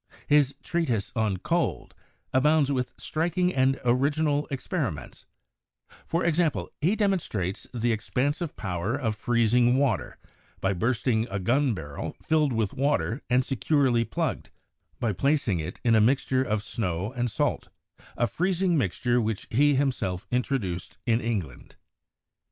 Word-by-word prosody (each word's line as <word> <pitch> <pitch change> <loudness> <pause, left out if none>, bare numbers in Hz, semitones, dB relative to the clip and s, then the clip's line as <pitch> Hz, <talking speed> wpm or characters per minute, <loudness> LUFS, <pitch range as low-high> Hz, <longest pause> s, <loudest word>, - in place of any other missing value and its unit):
His 145 -2 +3
'Treatise 130 - -1
on 110 -4 +1
Cold' 170 - -1 0.4
abounds 145 +2 +3
with 125 -2 -1
striking 175 +3 0
and 130 0 +2
original 145 +4 +2
experiments; 135 -2 -4 0.8
for 170 +2 0
example, 170 -2 +1
he 180 +8 +3
demonstrates 170 - -1
the 120 -1 0
ex 110 +1 -6
pansive 145 +5 -1
power 95 +3 -2
of 115 -6 -1
freezing 120 +2 +3
water 135 -4 0 0.4
by 95 +1 +1
bursting 115 +3 0
a 95 - -2
gun 125 +6 +1
barrel 75 -5 -6
filled 155 -3 +1
with 110 -4 -1
water 140 -2 0
and 125 +1 +3
securely 135 -1 +2
plugged, - - -3 0.5
by 115 -3 0
placing 135 - +1
it 80 - -6
in 115 - +3
a 110 - +5
mixture 130 +2 +2
of 110 -5 -1
snow 95 -3 -2
and 120 -1 -1
salt, - - -1 0.5
a 120 - +3
freezing 180 - +1
mixture 120 - +1
which 110 -2 -2
he 145 +5 +4
himself 125 -10 -1
introduced 120 -8 -2
in 115 -1 +2
England. 100 - -4
125 Hz, 135 wpm, -27 LUFS, 110-145 Hz, 0.8 s, a